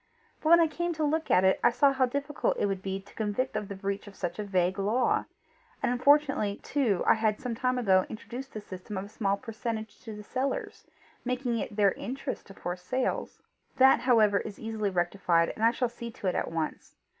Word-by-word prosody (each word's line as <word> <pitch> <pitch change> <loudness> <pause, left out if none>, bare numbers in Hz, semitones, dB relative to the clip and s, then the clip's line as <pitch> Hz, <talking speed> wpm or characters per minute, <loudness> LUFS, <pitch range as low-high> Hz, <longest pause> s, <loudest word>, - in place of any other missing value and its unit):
But 310 - 0
when 340 +1 +8
I 335 - +6
came 345 +3 -2
to 315 -1 -2
look 315 +2 0
at 185 - +5
it, 190 0 +4
I - - +7
saw 275 +4 +3
how 260 -1 +2
difficult 280 +3 -1
it - - +1
would 195 -2 -2
be 195 0 -3
to 195 - -17
convict 220 +3 -2
of 210 -1 -2
the 200 - -6
breach 200 +1 -4
of 200 - -11
such 175 +1 -4
a - - -1
vague 185 -1 0
law; 220 +6 +1 0.6
and - - +2
unfortunately 270 -5 +3
too 240 -10 +1
I - - +6
had 215 -1 0
some 250 -2 -3
time 255 +2 0
ago 190 -6 +3
introduced 245 +4 -8
the 215 - -5
system 190 0 -7
of 190 - -3
a - - -12
small 200 -2 0
percentage 220 -1 -5
to 220 -3 -8
the 210 - -9
sellers, 260 +5 -3 0.4
making 250 -2 -1
it 205 - -5
their 200 -2 +4
interest 260 +9 -5
to 195 - -12
force 175 +1 -5
sales. 255 +8 -2 0.3
That 265 +1 +6
however 215 -5 +4
is 205 - -7
easily 220 -2 -2
rectified, 175 -2 +1
and 220 - -5
I 230 - +7
shall 245 +1 0
see 235 0 -8
to 220 - -10
it 185 - +2
at - - -1
once. 165 -1 -4
220 Hz, 220 wpm, -29 LUFS, 195-255 Hz, 0.6 s, when